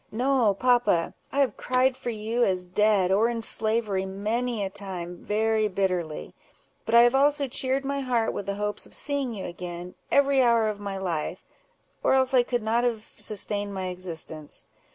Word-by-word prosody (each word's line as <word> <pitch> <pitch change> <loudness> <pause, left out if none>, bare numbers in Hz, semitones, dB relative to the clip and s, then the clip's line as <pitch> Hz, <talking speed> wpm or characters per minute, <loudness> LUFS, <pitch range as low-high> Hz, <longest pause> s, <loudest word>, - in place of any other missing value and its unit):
No, 245 -3 +2
papa! 245 -7 +2 0.2
I 280 - +2
have 255 -6 +1
cried 255 +1 +2
for 245 - -5
you, 225 +2 -1
as 185 -3 0
dead, 195 0 +2
or 215 +4 +3
in 235 -1 -2
slavery, 215 -3 +2
many 215 +4 -2
a 195 - -2
time, 180 -3 -6
very 220 0 +1
bitterly; 180 -5 -2 0.5
but 225 - +2
I 235 - +9
have 240 +1 +4
also 285 +1 +3
cheered 265 +1 0
my 280 0 -1
heart 245 -4 0
with 200 - -5
the 200 - -1
hopes 210 0 -3
of - - -10
seeing 280 -5 -2
you 195 - -5
again, 175 0 -7 0.2
every 280 -1 +4
hour 235 -3 +4
of 210 -1 -5
my 200 -1 -4
life, 175 -5 -3 0.6
or - - +3
else 260 0 +2
I 255 - +6
could 240 -1 -2
not 230 +2 +1
have 230 -3 0
sustained 205 -2 -3
my 185 -1 -3
existence. 165 -4 -5
215 Hz, 180 wpm, -26 LUFS, 190-245 Hz, 0.6 s, I